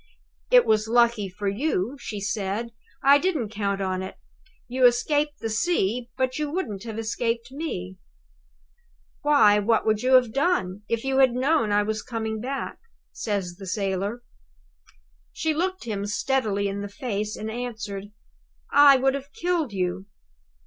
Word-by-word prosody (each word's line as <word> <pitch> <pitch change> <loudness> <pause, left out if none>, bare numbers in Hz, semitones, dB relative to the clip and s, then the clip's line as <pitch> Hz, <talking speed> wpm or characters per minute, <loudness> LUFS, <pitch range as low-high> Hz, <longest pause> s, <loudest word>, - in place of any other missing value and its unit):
"It's 220 - +4
lucky 235 -3 +3
for 200 +3 -5
you," 225 +1 -1
she 210 -5 -5
said, 210 +2 -2 0.3
"I 280 +1 +7
didn't 310 - -1
count 200 -2 -2
on 185 -1 -1
it. 190 - -6 0.5
You 255 +1 -4
have - - +10
escaped 290 +5 -1
the 225 - -2
sea, 235 - 0
but 260 +1 0
you 300 -1 -1
wouldn't 235 - -4
have 225 -2 -6
escaped 230 +2 -2
me." 265 - -5 1.2
"Why, 280 -9 +5
what 225 +2 +2
would 215 -1 +2
you 255 +1 +2
have 245 -3 +4
done, 275 - 0
if 230 -1 -1
you 270 0 +1
had 260 -3 +5
known 255 -3 +2
I 205 0 +3
was 215 +1 -2
coming 220 -3 -4
back?" 270 +3 -4 0.3
says 195 -5 -3
the 195 -1 -9
sailor. 200 +4 -2 1.1
She 315 - 0
looked 370 +4 -2
him 205 -4 -3
steadily 205 -1 0
in 200 0 -3
the 205 - -5
face, 210 -2 -3
and 220 +1 -5
answered: 215 -5 -5 0.7
"I 285 -1 +8
would 265 +1 +2
have 275 +1 -6
killed 340 -6 -1
you." 185 0 -2
225 Hz, 155 wpm, -25 LUFS, 205-270 Hz, 1.2 s, have